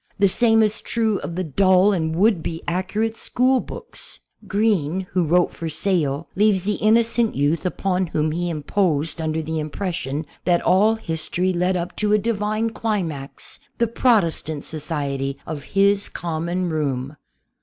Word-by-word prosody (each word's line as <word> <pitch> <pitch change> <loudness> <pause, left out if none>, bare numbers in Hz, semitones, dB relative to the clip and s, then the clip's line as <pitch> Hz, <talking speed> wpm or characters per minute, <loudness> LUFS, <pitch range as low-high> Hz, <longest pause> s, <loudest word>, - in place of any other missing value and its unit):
The 200 -1 +4
same 225 +2 +4
is 215 0 0
true 220 -3 0
of 165 - -6
the 185 - -1
dull 185 +5 +4
and 160 -3 -1
would 200 -1 +3
be 165 +1 -5
accurate 195 +6 -1
school 255 +3 +2
books. - - -8 0.3
Green, 190 -5 +1
who 180 - +2
wrote 175 +3 +2
for 165 - -5
sale, 160 -4 0
leaves 205 -2 +3
the 205 +1 -1
innocent 230 +1 +3
youth 150 +5 +1
upon 185 0 -1
whom 155 -1 0
he 175 +2 -2
im 155 -3 -4
posed 165 -4 0
under 160 0 -1
the 160 +1 -3
impression 155 -2 -3 0.2
that 175 -1 +2
all 205 +5 +4
history 180 -1 -2
led 180 +1 +1
up 175 0 -4
to 210 -1 +1
a - - +6
Divine 215 +1 -1
climax 175 -12 -4
— - - -44
the 235 - +3
Protestant 185 - +1
society 140 -3 -3
of 155 -2 -5 0.2
his 200 +1 +3
common 170 +2 -2
room. 140 -3 -2
180 Hz, 160 wpm, -22 LUFS, 160-210 Hz, 0.3 s, a